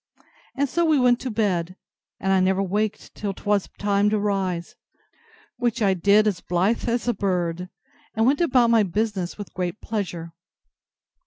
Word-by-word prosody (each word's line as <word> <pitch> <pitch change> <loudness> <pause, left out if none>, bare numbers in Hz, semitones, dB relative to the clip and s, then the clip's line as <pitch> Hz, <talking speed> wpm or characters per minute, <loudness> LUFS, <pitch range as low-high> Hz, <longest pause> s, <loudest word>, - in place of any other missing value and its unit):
And 280 +1 +1
so 340 +6 0
we 315 -2 +3
went 250 -1 +4
to 255 - -4
bed; 185 -6 -1 0.4
and 195 0 +1
I 190 - +4
never 190 +1 +2
waked 205 +2 -2
till 200 -2 -4
'twas 205 -1 0
time 205 0 +2
to 215 - +1
rise; 195 -4 -2 0.8
which 240 -1 -1
I 200 -4 +3
did 200 +4 +4
as 200 -4 0
blithe 190 +7 0
as 240 +1 -1
a 240 - +2
bird, 180 -3 -2 0.5
and 225 +1 +2
went 280 +6 +3
about 250 -7 +3
my 230 -1 +5
business 200 -1 -2
with 205 - -8
great 180 +2 -3
pleasure. 175 -6 -4
205 Hz, 165 wpm, -24 LUFS, 185-230 Hz, 0.8 s, my